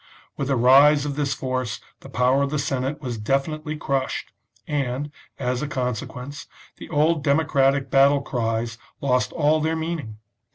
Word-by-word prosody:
With 140 - -3
the 135 - +1
rise 140 +4 +6
of 140 -1 -3
this 145 -2 -1
force 130 -3 -3 0.2
the - - -12
power 125 +4 +2
of 140 - +1
the 150 - -1
Senate 140 0 -2
was 120 -4 -4
definitely 150 +6 -1
crushed, 135 -2 -2 0.3
and, 140 0 -2 0.3
as 125 -2 -1
a 150 - -2
con 125 -3 -1
sequence, 125 +5 -8 0.3
the - - -10
old 155 +1 +2
democratic 140 -2 +2
battle 140 +1 +5
cries 115 -2 -2 0.2
lost 125 -2 +1
all 155 -1 +2
their 160 +1 0
meaning. 160 -9 -4
140 Hz, 160 wpm, -23 LUFS, 125-150 Hz, 0.3 s, rise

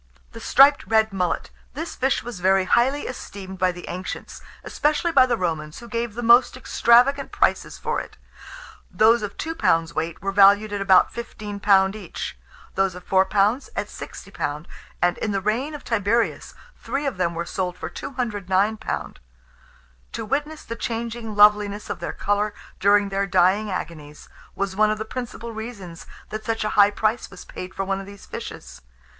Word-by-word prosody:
] - - -34
THE 230 - -8
STRIPED 275 +5 +5
RED 220 -1 +2
MULLET. 180 -3 -1 0.2
This 325 +4 -5
fish 265 +1 0
was 240 -6 -7
very 190 +1 +3
highly 260 +8 +2
esteemed 190 -6 -8
by 185 0 +3
the 175 0 -10
ancients, 185 +1 -6 0.2
especially 305 +3 0
by 265 -4 +6
the 240 -2 0
Romans, 160 -4 -3
who 235 - -10
gave 235 -2 -3
the 240 - -4
most 240 +2 +5
extravagant 255 +3 +3
prices - - 0
for - - -2
it. - - -10 0.7
Those 225 +2 +4
of 205 -1 -6
2 325 - -3
lbs. 165 - +1
weight 160 +1 -3
were 195 - -2
valued 205 +1 +5
at 200 - -2
about 190 -2 +5
£15 205 -4 +1
each; 200 -6 -6 0.4
those 195 -2 0
of 180 - -10
4 190 0 +3
lbs. 210 +6 +2
at - - -1
£60, 150 +2 -6 0.4
and, 175 0 +2
in 210 - -2
the 195 - +1
reign 235 +10 -1
of 290 - -9
Tiberius, 230 +1 0 0.2
three 280 +2 -3
of 270 -8 -2
them 170 -2 0
were 170 +1 -3
sold 180 0 -3
for 160 - -5
£209. 210 - -2 1.0
To - - -4
witness 295 +6 -2
the 230 - -6
changing 230 -1 -4
loveliness 210 0 +4
of - - -5
their 170 - -4
colour 205 +1 -1 0.2
during 200 0 +4
their 195 0 -1
dying 190 +3 +3
agonies, 155 -5 -7 0.3
was 195 -1 -2
one 215 +1 +4
of 215 - 0
the 220 - -4
principal 235 -1 -6
reasons 210 -7 -8 0.2
that 215 0 -5
such 225 -1 -2
a 215 - -1
high 205 -1 +5
price 215 +3 -1
was 180 - -12
paid 185 +1 -8
for 195 - -2
one 195 0 -1
of 195 - -9
these 200 0 -12
fishes. - - -8
205 Hz, 175 wpm, -23 LUFS, 190-235 Hz, 1.0 s, by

